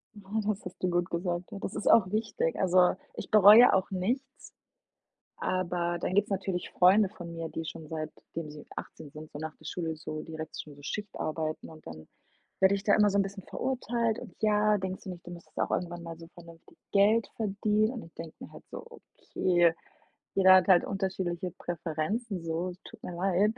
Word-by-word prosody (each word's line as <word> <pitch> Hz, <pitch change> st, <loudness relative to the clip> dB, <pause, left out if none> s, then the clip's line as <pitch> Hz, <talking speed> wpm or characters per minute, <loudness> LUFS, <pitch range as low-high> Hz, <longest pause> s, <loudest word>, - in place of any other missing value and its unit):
Ja, 200 Hz, -2 st, -14 dB, 0.2 s
das 210 Hz, -2 st, -2 dB
hast 180 Hz, -, -8 dB
du 180 Hz, -, +2 dB
gut 175 Hz, 0 st, 0 dB
gesagt. 175 Hz, 0 st, -3 dB
Und 195 Hz, -, -8 dB
das 200 Hz, -, -4 dB
ist -, -, -3 dB
auch 190 Hz, -4 st, +6 dB
wichtig. 215 Hz, -6 st, -1 dB
Also, 185 Hz, -1 st, +4 dB, 0.2 s
ich -, -, -7 dB
bereue 215 Hz, +3 st, +9 dB
auch 190 Hz, 0 st, +2 dB
nichts 250 Hz, +9 st, -3 dB, 0.9 s
aber 175 Hz, -1 st, -1 dB
dann 185 Hz, -, -2 dB
gibt 205 Hz, -, +4 dB
es -, -, -18 dB
natürlich 190 Hz, -2 st, -2 dB
Freunde 190 Hz, +3 st, +5 dB
von 175 Hz, -5 st, -9 dB
mir, 165 Hz, -1 st, -5 dB
die 165 Hz, -, -4 dB
schon 160 Hz, 0 st, -7 dB
seitdem 155 Hz, 0 st, -6 dB
sie 150 Hz, -1 st, -11 dB
18 155 Hz, -, -8 dB
sind, 155 Hz, 0 st, -10 dB
so 145 Hz, -, -8 dB
nach 160 Hz, 0 st, -5 dB
der 155 Hz, -, -14 dB
Schule 165 Hz, -2 st, -3 dB
so 155 Hz, 0 st, -6 dB
direkt 160 Hz, -1 st, -7 dB
schon 150 Hz, -2 st, -10 dB
so 145 Hz, -, -16 dB
Schichtarbeiten 160 Hz, -5 st, -4 dB
und 155 Hz, -1 st, -15 dB
dann 80 Hz, -1 st, -10 dB, 0.5 s
werde 190 Hz, +1 st, +5 dB
ich 195 Hz, -, -5 dB
da 205 Hz, -, +4 dB
immer 210 Hz, -1 st, +5 dB
so 200 Hz, -, +1 dB
'n 195 Hz, -, +4 dB
bisschen 195 Hz, 0 st, -7 dB
verurteilt 235 Hz, -3 st, -1 dB
und: 225 Hz, -8 st, -11 dB
„Ja, 210 Hz, 0 st, +4 dB
denkst 190 Hz, 0 st, -5 dB
du -, -, -6 dB
nicht, 180 Hz, -1 st, -8 dB
du 175 Hz, -, -8 dB
müsstest 170 Hz, -1 st, -12 dB
auch -, -, 0 dB
irgendwann 175 Hz, -1 st, -2 dB
mal 165 Hz, 0 st, -8 dB
so 165 Hz, -, -11 dB
vernünftig 170 Hz, -1 st, -15 dB
Geld 210 Hz, +3 st, +4 dB
verdienen?“ 215 Hz, +1 st, +1 dB
Und 235 Hz, -, -6 dB
ich 165 Hz, -, -17 dB
denke 165 Hz, -1 st, -9 dB
mir -, -, -9 dB
halt -, -, -12 dB
so: -, -, -8 dB
„Okay, 175 Hz, -2 st, +1 dB, 0.6 s
jeder 190 Hz, -1 st, +7 dB
hat 185 Hz, 0 st, +4 dB
halt 180 Hz, -2 st, +6 dB
unterschiedliche 185 Hz, -3 st, -2 dB
Präferenzen 175 Hz, +4 st, -3 dB
so, 170 Hz, +3 st, -2 dB
tut -, -, -13 dB
mir 175 Hz, -, -6 dB
leid.“ 195 Hz, +4 st, +2 dB
180 Hz, 200 wpm, -29 LUFS, 165-205 Hz, 0.9 s, bereue